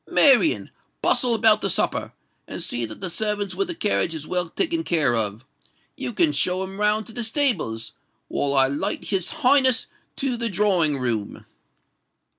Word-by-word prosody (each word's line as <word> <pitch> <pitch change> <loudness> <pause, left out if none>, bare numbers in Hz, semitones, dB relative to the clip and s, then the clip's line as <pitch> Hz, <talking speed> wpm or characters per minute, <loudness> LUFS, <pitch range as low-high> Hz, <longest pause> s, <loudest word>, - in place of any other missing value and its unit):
Marian, 285 +3 +3 0.3
bustle 245 -2 +3
about 220 -1 +4
the 195 - -1
supper—and - - -4
see 120 -1 -1
that 110 -1 -10
the 185 - -2
servants 205 +1 -2
with 395 - -1
the 345 - -4
carriage 205 - 0
is 155 -1 -6
well 180 -1 -1
taken 330 - -1
care 155 - +2
of. 110 +2 -2 0.5
You - - -4
can 335 -4 +2
show 185 -8 0
'em 190 +1 -8
round 210 +1 +2
to 225 - -9
the 240 - -3
stables; 215 - 0 0.3
while 140 0 -1
I 135 -1 +5
light 140 +2 -3
his 190 -2 0 0.2
Highness 260 -2 +4 0.3
to 265 -3 -2
the 235 0 -1
drawing 180 -7 +2
room." 115 -5 -3
195 Hz, 165 wpm, -23 LUFS, 145-240 Hz, 0.5 s, I